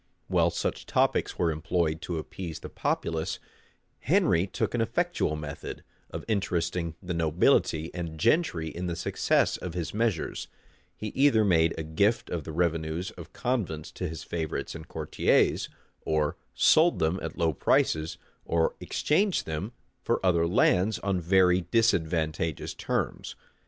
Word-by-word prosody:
[*] - - -44
While - - +3
such - - -3
topics - - +1
were 85 -2 +2
employed 80 0 -1
to 85 -3 -3
appease 80 +1 -6
the - - -7
populace, 80 -1 -2 0.6
Henry 85 +4 +2
took - - -2
an 120 - +1
effectual 120 - 0
method 75 -2 -7 0.3
of - - -6
interesting 85 -5 -1
the 90 -1 -3
nobility 80 0 +2
and 85 -3 -5
gentry 115 - +2
in 90 +3 -5
the 85 - -2
success 85 - +1
of 90 -2 -6
his 85 -3 -3
measures:[] 110 -6 -1 0.5
he 105 - -5
either 130 -3 +4
made 85 -4 +3
a 80 - -3
gift 100 +9 +1
of 85 -4 -3
the 80 - -5
revenues 80 +1 -1
of - - -11
convents 95 -12 -2
to 90 - -4
his 80 -1 -7
favorites 80 -4 -3
and 80 0 -9
courtiers, 80 -3 +1 0.3
or 75 -1 0 0.2
sold 165 +2 +5
them 80 +4 +1
at - - -5
low 85 -2 +2
prices, 80 +3 +1 0.3
or 80 -1 +1
exchanged 190 +5 +1
them 80 +8 -4 0.3
for - - 0
other 85 -2 +3
lands 95 +4 +3
on 95 -2 -1
very 90 +1 +4
disadvantageous 80 -8 +1
terms. - - -3
85 Hz, 145 wpm, -28 LUFS, 80-95 Hz, 0.6 s, sold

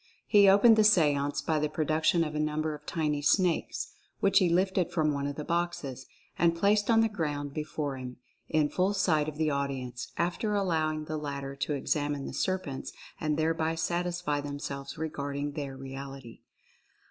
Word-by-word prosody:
He 200 -2 +6
opened 220 +3 +7
the 215 - +6
seance 145 -8 +3
by 155 +1 +1
the 150 0 0
pro 155 +1 -1
duction 160 +2 +2
of 150 - -7
a 150 - -2
number 155 +1 -1
of 150 0 -11
tiny 150 -3 -1
snakes, 175 +3 +1 0.3
which 195 -1 +4
he 180 - +3
lifted 185 0 +1
from 155 -3 +1
one 140 0 -2
of 145 - -4
the 150 - -5
boxes, 170 -6 -2 0.3
and 170 -1 +4
placed 205 +4 +2
on 225 -1 +5
the 225 - +4
ground 145 -8 -3
be 155 - -2
fore 145 -3 -4
him, 125 -1 -7 0.3
in 155 -2 +3
full 190 +5 +1
sight 155 -6 +2
of 150 - -10
the 155 -1 +1
audience, 135 -3 -3
after 180 +5 0
allowing 155 -5 0
the 155 0 -3
latter 140 -2 -5
to 140 +2 -1
examine 145 0 -1
the - - -6
serpents 185 -8 -2 0.3
and 155 -1 0
thereby 160 0 0
satisfy 170 -3 -1
themselves 140 -1 -6
regarding 145 -2 -3
their 140 -2 -5
reality. 135 -2 -8
155 Hz, 180 wpm, -29 LUFS, 140-175 Hz, 0.3 s, opened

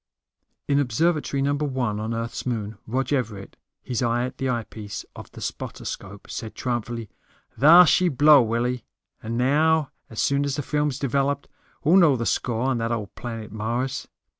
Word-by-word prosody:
In 140 0 +3
Observatory 145 +1 +1
No. 140 +1 +2
1 130 -7 -1
on 110 +1 -3
Earth's 115 +1 -4
moon, 110 -3 -3
Rog 130 +5 -1
Everett, 110 -7 -3 0.3
his 125 -4 -2
eye 120 0 +1
at 130 - -8
the 135 - 0
eyepiece 110 -3 -4
of - - -10
the - - -10
spotter - - -5
scope, 100 +1 -7
said 115 -5 -6
triumphantly, 120 -3 -3 0.5
"Thar 170 +6 +9
she 180 +2 +4
blew, 145 0 +6
Willie. 120 +1 -1 0.4
And 115 +1 -4
now, 150 +4 +3 0.2
as 110 - -7
soon 140 0 +2
as 140 -1 -1
the 145 - -3
films 150 -2 0
are - - -13
developed, 140 +2 0 0.4
we'll 165 +6 +5
know 165 -7 +6
the 115 -2 -2
score 115 +3 0
on 130 -2 +1
that 115 0 -1
old 105 -4 -3
planet 115 -3 -7
Mars." 120 +5 -2
125 Hz, 175 wpm, -24 LUFS, 115-140 Hz, 0.5 s, Thar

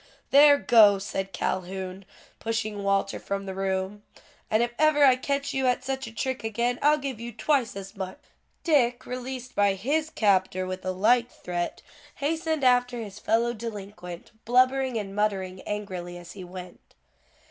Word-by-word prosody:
"There, 285 +1 +8
go," 210 -2 +6
said 195 0 -4
Calhoun, 185 +1 -3 0.3
pushing 220 -2 -2
Walter 195 0 0
from 200 0 -4
the 190 - -5
room, 190 +1 -2 0.5
"and 220 +2 +3
if 240 - -1
ever 310 -1 +4
I 265 -2 +7
catch 280 +2 -2
you 265 -1 +1
at 250 - +1
such 265 -2 -3
a - - -8
trick 260 +3 -3
again, 235 +3 -1
I'll 300 +1 +5
give 270 -5 -5
you 235 +1 -6
twice 260 -1 0
as 195 +1 -8
much." 190 -1 -5 0.5
Dick, 245 -7 +2
released 255 0 -6
by 200 -1 +3
his 300 +10 0
captor 190 - +1
with 185 0 -5
a 185 - -1
like 230 +6 +3
threat, 175 -5 -4 0.3
hastened 315 0 -1
after 245 -1 +3
his 210 -2 -7
fellow 230 +3 +1
delinquent, 200 -6 -8
blubbering 255 +1 +3
and 200 -2 -5
muttering 190 -3 -1
angrily 185 -4 -5
as 175 -1 -11
he 190 - -9
went. 180 0 -11
215 Hz, 160 wpm, -26 LUFS, 195-255 Hz, 0.5 s, There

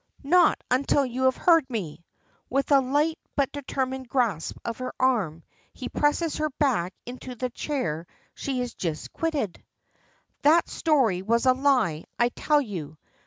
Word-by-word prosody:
"Not 350 +5 +4
until 275 +2 +3
you 255 +1 -2
have 260 - +3
heard 330 -6 +4
me!" 180 -9 -5 0.5
With 275 +3 0
a 280 - +7
light, 295 +5 +1 0.2
but 280 -2 +1
determined 265 -2 -3
grasp 225 - 0
of 230 0 -4
her 255 0 -3
arm, 195 -12 +1 0.3
he 255 - -6
presses 295 +2 +1
her 310 0 0
back 205 - +1
into 250 +1 -8
the 250 +1 -3
chair 175 - -3 0.3
she 265 -3 -3
has 245 -2 -4
just 160 -4 -4
quitted. 295 - -2 0.8
"That 320 +4 +5
story 260 - +2
was 230 +5 +1
a 255 - +6
lie, 255 - +1
I 240 0 +3
tell 295 +4 +2
you. 160 - -7
255 Hz, 155 wpm, -26 LUFS, 215-285 Hz, 0.8 s, a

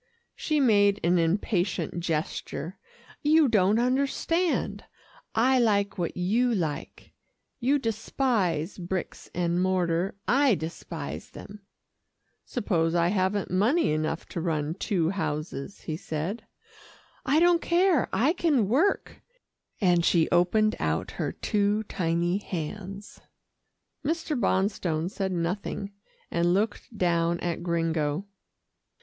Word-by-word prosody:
She 305 -1 0
made 205 -6 +4
an 175 +1 +3
impatient 175 +1 0
gesture. 165 0 -3 0.4
"You 305 0 +5
don't 210 -2 +3
understand. 280 +8 0 0.5
I 255 +3 +4
like 200 -4 +1
what 170 - -2
you 225 +7 +2
like. 155 -7 -4 0.5
You 270 +3 +3
despise 215 - -1
bricks 180 +1 -5
and 175 0 +1
mortar, 180 -1 0
I 275 -3 +4
despise 160 -2 -6
them." 205 0 -11 0.8
"Suppose 170 -8 0
I 170 0 +3
haven't 190 0 0
money 220 - +2
enough 155 +1 -1
to 170 - -4
run 155 -2 -1
two 180 -3 0
houses," 155 -2 -4
he 155 -2 -4
said. 175 +9 -4 0.8
"I 280 +4 +3
don't 345 0 +4
care 345 - +2
I 280 +8 +2
can 295 - +2
work," 305 - +1 0.6
and 175 -4 +3
she 165 -1 +3
opened 215 +5 +3
out - - -1
her - - -3
two 210 0 0
tiny 175 -1 0
hands. 195 +3 -6 0.8
Mr. 315 0 -1
Bonstone 190 - 0
said 195 -2 -2
nothing, 185 +3 -3 0.4
and 170 +1 +2
looked 215 +2 -2
down 170 -2 +1
at 175 -1 -2
Gringo. 165 -1 -1
190 Hz, 115 wpm, -27 LUFS, 170-225 Hz, 0.8 s, You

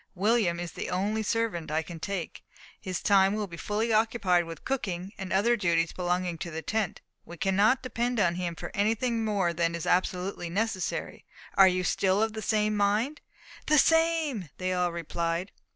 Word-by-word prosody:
William 195 -3 +2
is 175 -1 -5
the - - -5
only 205 +4 0
servant 220 -8 -1
I 155 +1 0
can 170 0 -9
take. 175 +1 -5 0.4
His 185 -2 -4
time 195 0 +4
will 215 -1 -1
be 170 -4 -9
fully 215 +6 -1
occupied 215 -6 +2
with 165 -2 -9
cooking, 195 -7 -3
and 190 -1 -7
other 220 +5 +3
duties 170 -6 +1
belonging 180 -1 -1
to 175 - -4
the 160 0 -6
tent. 215 -4 -2 0.2
We 170 - -11
cannot 205 - +2
depend 245 -1 -1
on 170 -4 +3
him 175 -1 -3
for 175 - -7
anything 225 +3 0
more 200 -5 +1
than 170 0 0
is 170 - -4
absolutely 180 0 0
necessary. 195 0 -3 0.3
Are 195 - +8
you 185 0 +1
still 190 +2 +2
of 220 -1 -1
the 220 - -5
same 215 0 +1
mind?" 210 +9 +1 0.5
"The 305 - +5
same!" 325 - +2
they 185 0 -1
all 180 -1 +1
replied. 170 +2 -3
190 Hz, 180 wpm, -28 LUFS, 175-220 Hz, 0.5 s, Are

